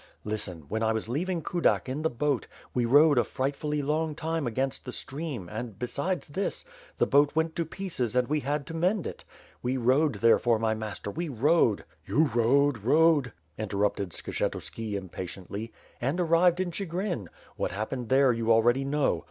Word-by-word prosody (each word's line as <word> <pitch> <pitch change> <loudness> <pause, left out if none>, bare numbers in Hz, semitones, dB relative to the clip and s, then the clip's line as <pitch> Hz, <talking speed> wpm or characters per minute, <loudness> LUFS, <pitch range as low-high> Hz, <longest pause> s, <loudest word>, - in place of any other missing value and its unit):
Listen, 105 -5 -3
when 110 +8 -2
I 110 0 +2
was 110 0 -3
leaving 170 +7 -2
Kudak 175 -5 +1
in 135 +4 -3
the 160 - +1
boat, 140 0 -1 0.3
we 125 -1 +1
rowed 145 +1 +6
a - - +4
frightfully 145 +2 -2
long 155 +2 0
time 160 -3 -2
against 130 +3 -2
the 125 - -6
stream 135 - -4
and, 110 +1 -6
besides 140 - -2
this, 195 - -3 0.3
the - - +3
boat 145 +1 +3
went 160 0 0
to 170 - 0
pieces 155 - -3
and 125 -1 +3
we 150 +1 +1
had 145 0 -2
to 165 - -8
mend 180 +4 +1
it. - - -6 0.4
We 125 +2 -1
rowed, 130 +3 +3
therefore, 115 +2 +4
my 110 0 +1
master, 105 -2 -5
we 170 +4 -3
rowed,.... 135 -3 +3
" 75 - -36
^TTou 140 +5 +2
rowed, 130 +3 +3
rowed!" 145 +2 +4 0.3
interrupted 100 -2 -1
Skshetuski 105 +5 -4
impatiently. 95 +3 -6 0.3
"And 135 +9 0
arrived 170 +1 +4
in 185 -2 -1
Chigrin. 175 - -3 0.3
Wha't - - -2
happened 110 +5 -4
there, 135 -1 +5
you 115 0 0
al 115 0 +5
ready 120 +3 +3
know." 140 - +1
135 Hz, 175 wpm, -28 LUFS, 115-160 Hz, 0.4 s, rowed